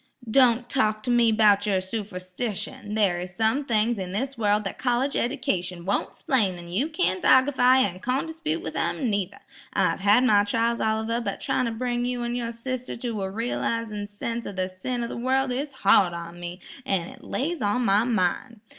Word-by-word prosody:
"Don't 245 -1 +4
talk 215 -5 +1
to 245 - -1
me 240 -2 +4
'bout 210 -1 +4
yer 195 -2 +2
suferstition; 205 +1 -5
there 195 -5 +2
is 180 +1 -7
some 225 +6 +1
things 230 -2 +1
in 185 -1 -5
this 265 +6 -2
wurl 210 -2 +2
that 195 - -6
college 255 +2 0
edication 190 -10 -1
won't 200 +2 -1
'splain, 205 -9 +1
an' 170 0 -10
you 215 - 0
can't 310 - 0
argify 260 -1 +5
an' 185 -4 -3
condispute 315 - -2
with - - -6
'em, 250 -6 -1
neither. 200 -1 -2 0.4
I've - - +1
had 205 +5 +4
my 210 -5 +5
trials, 230 +3 0
Oliver, 220 +2 0
but - - -4
tryin' 250 - 0
to - - -2
bring 240 +1 -2
you 245 -1 -2
an' 240 0 -2
yer 235 -1 -2
sister 255 +2 -5
to 235 -3 -3
a 190 - -2
realisin' 225 -1 -2
sense 230 +3 -5
of 200 - -7
the 185 0 -1
sin 240 +7 -4
in 235 - -4
the - - -5
wurl 260 +2 +1
is 275 +4 -3
hard 195 -7 +4
on 170 0 -7
me, 175 +1 -7 0.2
an' 190 -8 -1
it - - -14
lays 315 +3 -2
on 215 +4 +1
my 200 +2 +4
mind. 225 +1 -1
225 Hz, 195 wpm, -25 LUFS, 195-250 Hz, 0.4 s, argify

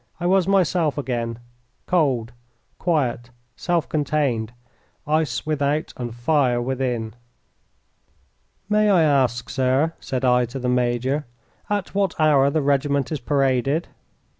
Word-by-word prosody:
I 175 - -4
was 185 0 +3
myself 180 -6 +2
again, 120 -4 -3 0.5
cold, 135 -10 +1 0.5
quiet, 130 -8 0 0.3
self 175 -3 -1
contained, 140 -7 -1 0.5
ice 150 -4 0
without 150 0 -1
and 120 -2 -5
fire 125 -1 +1
within. 120 -3 -2 1.5
"May 210 0 +3
I 180 -5 +5
ask, 130 -5 +1
sir," 135 +5 +1
said 130 0 -3
I 125 0 +4
to 120 +3 -7
the 125 -1 -3
major, 125 +3 0 0.4
"at 205 -3 -2
what 195 -4 0
hour 145 -3 +4
the 150 +1 0
regiment 140 0 +1
is 155 - -2
paraded?" 135 +3 0
140 Hz, 120 wpm, -22 LUFS, 125-155 Hz, 1.5 s, I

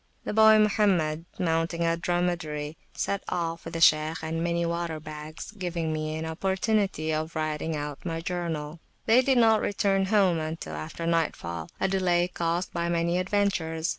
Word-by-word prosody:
The - - -3
boy 220 0 +7
Mohammed, 190 -7 +2
mounting 165 -1 0
a 165 0 +2
dromedary, 170 -4 -2 0.2
set 200 -1 -2
off 170 -1 -3
with 165 +1 -7
the 165 - -2
Shaykh 155 0 +4
and 165 +1 -2
many 170 0 0
water 170 -1 -2
bags, 155 +2 -8
giving 175 -6 -3
me 155 0 -2
an 160 +1 -4
opportunity 190 -1 0
of 155 +2 -3
writing 155 0 -2
out 145 -1 -5
my 165 -2 -3
journal. 165 -3 -4 0.3
They 230 +3 +6
did 265 0 +2
not 225 -2 +5
return 195 -1 +1
home 190 -4 +3
until 155 - -5
after 75 - -5
nightfall, 85 - -1
a - - +2
delay 180 -2 +2
caused 175 0 -2
by 170 0 -1
many 170 +1 +1
adventures. 180 -4 0
170 Hz, 165 wpm, -27 LUFS, 155-185 Hz, 0.3 s, boy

